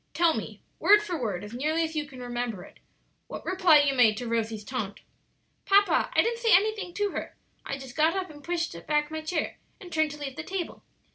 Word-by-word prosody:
Tell 335 +1 +4
me, - - -6 0.2
word 415 +1 +6
for 365 -4 -3
word, 205 -5 -2
as 205 +2 -9
nearly 310 +6 0
as 320 0 -4
you 300 -1 -2
can 260 -3 -10
remember 240 -5 -3
it, - - -16 0.5
what - - -8
reply 360 -5 +5
you 285 -1 +2
made 225 -5 +4
to 245 - -4
Rosie's 225 -2 -2
taunt." 215 -4 -5 0.7
"Papa, 400 +1 +4
I - - +6
didn't 465 0 -1
say 455 -5 +5
anything 415 -1 +1
to 410 -1 0
her; - - -5 0.3
I - - -3
just 265 -3 -10
got 315 +3 +3
up 375 -3 -3
and 290 -1 -14
pushed 345 +1 -2
back 300 0 +1
my 315 0 -4
chair, 310 0 -3 0.2
and 355 -3 -11
turned 315 -1 +2
to 295 - -8
leave 280 -2 -6
the 310 - -4
table. 365 0 -5
310 Hz, 220 wpm, -27 LUFS, 250-355 Hz, 0.7 s, word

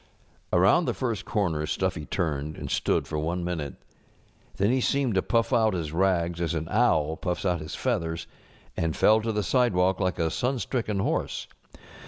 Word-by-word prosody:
Around 95 - +4
the - - -1
first 115 -8 -2
comer 85 -8 0
Stuffy 75 - -2
turned, 75 -4 -2
and - - -6
stood - - +1
for 75 - -2
one 85 +3 -2
minute. 80 -6 -3 0.8
Then 100 +4 +2
he 130 0 +2
seemed 135 -2 +1
to 95 - +2
puff 115 +4 +1
out 110 -4 +3
his 80 -4 -3
rags 85 -1 +1
as 85 -1 0
an 80 0 -3
owl 80 -9 +2
puffs 90 +2 -3
out 90 -2 +1
his 80 - -6
feathers, 80 0 -2 0.5
and 80 -2 -1
fell 110 +1 +5
to 115 +1 -1
the 105 -1 0
side┬¼ 125 +1 +2
walk 90 +1 +2
like 95 -2 0
a 80 -2 0
sunstricken 120 -4 -1
horse. - - -1
90 Hz, 180 wpm, -27 LUFS, 80-110 Hz, 0.8 s, fell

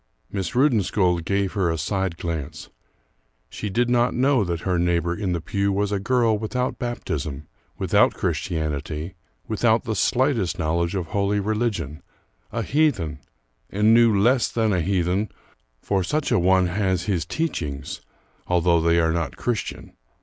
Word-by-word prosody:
Miss 100 +3 -3
Rudensköld 100 - +2
gave 100 -1 0
her 95 -5 +1
a 80 - -1
side 95 +1 -2
glance; 80 -3 -5 0.8
she 105 - -4
did 120 +5 +1
not 120 0 +2
know 130 -2 +3
that 85 -3 -3
her 90 -2 0
neighbor 85 -1 +1
in 95 -3 -2
the 85 - -1
pew 100 +3 -1
was 100 +1 0
a 100 - 0
girl 115 +1 +2
without 125 +4 -2
baptism, 75 - -4 0.3
without - - +3
Christianity, 75 +1 -3 0.3
without 110 +1 +2
the 110 -3 -2
slightest 115 -3 +1
knowledge 85 +2 0
of 90 -3 -1
holy 100 0 +1
religion, 100 - -2 0.5
a 115 - -2
heathen 105 - +1 0.5
and 105 +3 +3
knew 115 -3 +5
less 120 +4 +3
than 110 -3 +1
a 90 - +1
heathen, 95 +3 0 0.5
for 95 -2 0
such 150 - -1
a - - +4
one 95 +1 +4
has 95 -1 0
his 95 -6 0
teachings, 75 - -3 0.5
although 85 -1 +3
they 85 +1 +3
are 80 -1 +2
not 80 -4 -2
Christian. 120 -3 -3
95 Hz, 150 wpm, -23 LUFS, 85-110 Hz, 0.8 s, knew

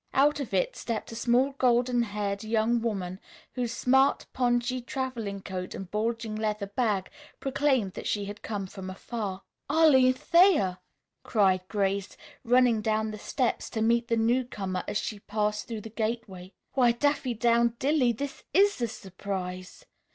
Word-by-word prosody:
Out 290 +2 +4
of 275 - -4
it 190 -2 0
stepped 230 -1 -4
a - - -7
small, 245 +4 +2
golden 245 -1 +3
haired 205 -2 -2
young 225 +2 +1
woman 190 -5 -3 0.3
whose 245 -2 -2
smart 265 +3 +3
pongee 245 0 +1
traveling 240 -7 -4
coat 185 -2 -5
and 190 -2 -8
bulging 225 0 -2
leather 215 -1 -1
bag 200 -2 -1 0.3
proclaimed 270 -7 +1
that - - -6
she 205 -1 -1
had 205 +1 -8
come 205 -3 -4
from 190 0 -8
afar. 195 0 -5 0.3
"Arline 280 -5 +5
Thayer!" 325 - +4 0.4
cried 190 -4 +2
Grace, 200 -1 -1 0.3
running 245 -2 +4
down 215 0 0
the 215 - -7
steps 250 +2 -1
to 220 - -1
meet 235 +1 +2
the 230 - +1
newcomer 225 -6 0
as - - -1
she 210 -1 -4
passed 210 +1 -2
through 225 -3 -5
the 225 - -8
gateway. 215 -5 -4 0.2
"Why, 245 -3 +4
Daffydowndilly! 240 0 +2
This 280 +1 -5
is 400 -5 +4
a 235 - +1
surprise! 185 -3 -6
225 Hz, 150 wpm, -28 LUFS, 200-250 Hz, 0.4 s, Arline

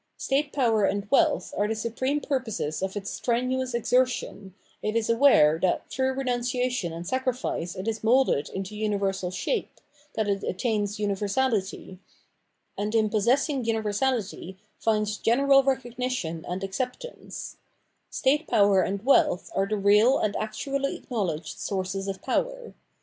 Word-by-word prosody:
State 280 +2 0
power 230 -6 +2
and 200 +1 0
wealth 300 -1 +2
are 205 - +1
the 220 - -1
supreme 245 +6 -1
purposes 225 - -2
of 190 +1 -3
its 200 0 -4
strenuous 255 +1 -1
exertion, 235 -5 0 0.3
it 215 +1 -2
is 230 0 +1
aware 165 - +5
that 185 - 0
through 260 0 0
renunciation 250 -5 -1
and 165 +1 -7
sacrifice 255 -7 -2
it 190 +3 -6
is 220 -1 -2
moulded 235 - +3
into 195 +2 -5
universal 200 -3 -1
shape, 295 - -3 0.4
that 220 -1 0
it 200 -1 0
attams 205 0 -1
universality, 205 -1 -1 0.8
and 210 +2 -2
in 215 -2 +2
possessing 255 +6 +2
universality 220 -3 -1 0.2
finds 215 -1 0
general 275 +4 +4
recognition 250 -10 -2
and 180 +2 -4
acceptance: 250 - -5 0.5
state 290 +4 +1
power 200 -2 +4
and 200 +4 -2
wealth 255 -9 +3
are 195 0 +1
the 215 +1 -1
real 210 +6 +5
and 210 -1 -1
actually 275 +6 -2
acknowledged 185 - -4
sources 195 0 -3
of 195 -1 -5
power. - - -2
220 Hz, 135 wpm, -26 LUFS, 195-255 Hz, 0.8 s, aware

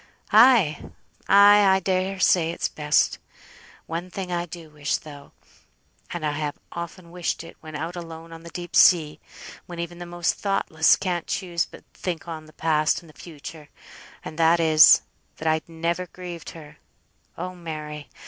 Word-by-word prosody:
"Ay! 220 - +6 0.5
ay! 205 +1 +7
I - - +2
dare 190 +1 -1
say 170 -3 +3
it's 170 - -2
best. 150 -1 +1 0.7
One 170 +2 -5
thing 180 0 -6
I 175 0 -2
do 165 -2 -10
wish 145 -1 -1
though, 145 -2 -13 0.8
and 170 -3 -4
I 150 - +1
have 145 0 -3
often 170 0 -8
wished 175 -1 -3
it 165 - -12
when 155 -1 -9
out 165 +4 -4
alone 165 -1 -9
on 165 - -10
the 170 - -10
deep 175 +1 -7
sea, 160 -5 +5 0.5
when 175 - -8
even 170 +1 -6
the 175 - -7
most 175 -1 0
thoughtless 160 -5 +2
can't 175 -3 -3
choose 175 -3 -2
but - - -14
think 175 -2 -5
on 160 -2 -7
th' 155 - -20
past 155 +1 +1
and 160 -2 -16
th' - - -25
future; 155 -2 -10 0.6
and 155 - -8
that 165 +1 +4
is, 160 -1 +7 0.3
that 160 - -4
I'd 160 +1 0
never 170 +2 -2
grieved 175 -2 -8
her. 150 -2 -13 0.6
Oh 185 +2 -5
Mary! 155 -4 -7
170 Hz, 165 wpm, -24 LUFS, 155-180 Hz, 0.8 s, ay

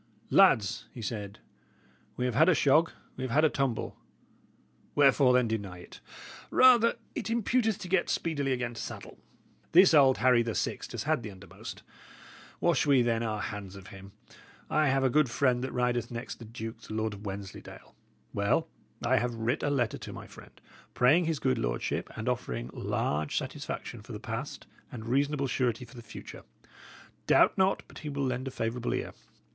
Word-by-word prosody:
"Lads," 125 - +4
he 120 - -9
said, 105 -2 -5 0.8
"we 125 - -1
have 125 - 0
had 160 +9 +5
a 180 - +5
shog, 150 +4 +4 0.3
we 130 - -4
have 130 - -2
had 150 +7 +4
a - - +5
tumble; 135 -5 -1 1.0
wherefore, 140 -2 +5
then, 125 -1 +3
deny 100 -5 -3
it? 90 - -13 0.5
Rather 240 -3 +6 0.2
it - - -4
imputeth 230 -1 +1
to 185 - -8
get 180 -1 +1
speedily 145 -5 -1
again 125 -2 -1
to 115 - -7
saddle. - - -8 0.5
This 180 +1 +7
old 135 -4 +6
Harry 125 -2 +4
the 115 -2 -2
Sixt - - -3
has - - -3
had - - +1
the 110 - -6
undermost. 100 0 -10 0.8
Wash - - +2
we, 135 -4 +5
then, 115 -1 +1
our 110 -2 -2
hands 100 -2 -6
of 95 -1 -11
him. 95 0 -12 0.6
I 155 0 +3
have 135 0 +2
a 130 - +4
good 150 -2 +3
friend 125 0 +1
that 130 - -3
rideth 120 -1 0
next 120 +2 -6
the 115 - -9
duke, 115 0 -7
the 110 - -8
Lord 110 -1 -1
of 100 +1 -8
Wensleydale. 100 0 -8 0.4
Well, 100 +11 +1 0.4
I 130 +2 +3
have 120 -1 -1
writ 115 +4 -1
a 145 - 0
letter 125 -6 0
to - - -8
my - - -9
friend, - - -15 0.4
praying 145 +8 +4
his 160 -1 0
good 130 -1 0
lordship, - - -2
and - - -5
offering - - -2
large 75 0 -1
satisfaction - - -5
for - - -10
the - - -6
past - - -6 0.3
and 110 -3 -7
reasonable 140 +3 +1
surety 125 -2 -1
for 120 +1 -16
the 120 - -9
future. 115 - -10 0.9
Doubt - - +5
not 190 0 +2
but - - -12
he 150 - -6
will 140 -1 -2
lend 130 +1 -2
a - - -4
favourable 115 +1 -2
ear. - - -3
125 Hz, 185 wpm, -29 LUFS, 110-145 Hz, 1.0 s, This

